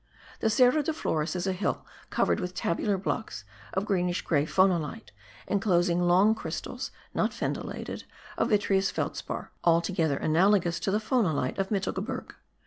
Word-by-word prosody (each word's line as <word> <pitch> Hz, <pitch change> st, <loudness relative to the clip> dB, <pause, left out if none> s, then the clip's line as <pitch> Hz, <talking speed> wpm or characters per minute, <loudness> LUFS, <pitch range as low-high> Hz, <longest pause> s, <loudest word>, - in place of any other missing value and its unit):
The 220 Hz, -, +2 dB
Cerro 250 Hz, +6 st, +4 dB
de 310 Hz, +2 st, -1 dB
Flores 160 Hz, -, -1 dB
is 180 Hz, -, -2 dB
a 190 Hz, -, +1 dB
hill 185 Hz, -, -2 dB, 0.2 s
covered -, -, +1 dB
with 180 Hz, -2 st, -4 dB
tabulary 195 Hz, +4 st, 0 dB
blocks 185 Hz, -, -3 dB, 0.3 s
of 190 Hz, +2 st, 0 dB
greenish 180 Hz, -3 st, 0 dB
grey 150 Hz, -2 st, +1 dB
phonolite, 180 Hz, -6 st, +1 dB, 0.4 s
enclosing 180 Hz, -3 st, +2 dB
long 185 Hz, +5 st, +5 dB
crystals 220 Hz, -, -5 dB, 0.2 s
(not -, -, +1 dB
fendillated) -, -, -4 dB, 0.3 s
of -, -, 0 dB
vitreous 195 Hz, -2 st, +2 dB
felspar, -, -, -4 dB
altogether 165 Hz, -3 st, +2 dB
analogous 175 Hz, +2 st, +3 dB
to -, -, -2 dB
the 200 Hz, -, +2 dB
phonolite 200 Hz, -, 0 dB
of 195 Hz, -, 0 dB
Mittelgebirge. 210 Hz, +5 st, -3 dB
190 Hz, 140 wpm, -28 LUFS, 170-210 Hz, 0.4 s, long